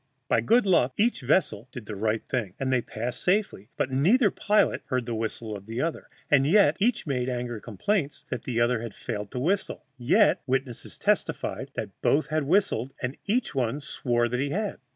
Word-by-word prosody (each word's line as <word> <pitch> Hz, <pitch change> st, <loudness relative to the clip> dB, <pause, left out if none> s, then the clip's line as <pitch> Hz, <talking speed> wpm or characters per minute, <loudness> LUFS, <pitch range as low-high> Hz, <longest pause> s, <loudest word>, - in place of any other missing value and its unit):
By -, -, +3 dB
good 235 Hz, 0 st, +4 dB
luck 135 Hz, -9 st, +3 dB
each 235 Hz, +3 st, +2 dB
vessel 125 Hz, -, +1 dB
did 120 Hz, -4 st, -8 dB
the 105 Hz, -, -6 dB
right 110 Hz, +2 st, 0 dB
thing, 110 Hz, -8 st, -2 dB
and 130 Hz, -1 st, 0 dB
they 125 Hz, -, +3 dB
passed 120 Hz, +2 st, -4 dB
safely, 180 Hz, -, 0 dB
but 130 Hz, -, -1 dB
neither 195 Hz, -, +4 dB
pilot 210 Hz, +1 st, +2 dB
heard 130 Hz, -3 st, -1 dB
the 120 Hz, -, -3 dB
whistle 110 Hz, -1 st, -3 dB
of 100 Hz, 0 st, -10 dB
the 115 Hz, +2 st, -4 dB
other, 165 Hz, +3 st, -2 dB, 0.2 s
and 140 Hz, -2 st, +6 dB, 0.4 s
each 230 Hz, +4 st, +1 dB
made 130 Hz, -4 st, -1 dB
angry 120 Hz, -3 st, -3 dB
complaint 145 Hz, -, -2 dB
that -, -, -2 dB
the 120 Hz, -2 st, -2 dB
other 120 Hz, -1 st, +2 dB
had 115 Hz, -3 st, -7 dB
failed 105 Hz, -3 st, -5 dB
to 125 Hz, -, -4 dB
whistle: 190 Hz, +8 st, -1 dB
yet 170 Hz, -, +4 dB
witnesses 130 Hz, -2 st, -2 dB
testified -, -, -1 dB
that -, -, -4 dB
both 150 Hz, +1 st, +3 dB
had 155 Hz, -1 st, 0 dB
whistled, 145 Hz, -, +1 dB
and 125 Hz, +2 st, -3 dB
each 235 Hz, +4 st, 0 dB
one 130 Hz, 0 st, 0 dB
swore 120 Hz, -4 st, 0 dB
that 125 Hz, +1 st, -2 dB
he 140 Hz, +1 st, 0 dB
had. 205 Hz, +6 st, -2 dB
130 Hz, 195 wpm, -27 LUFS, 120-165 Hz, 0.4 s, and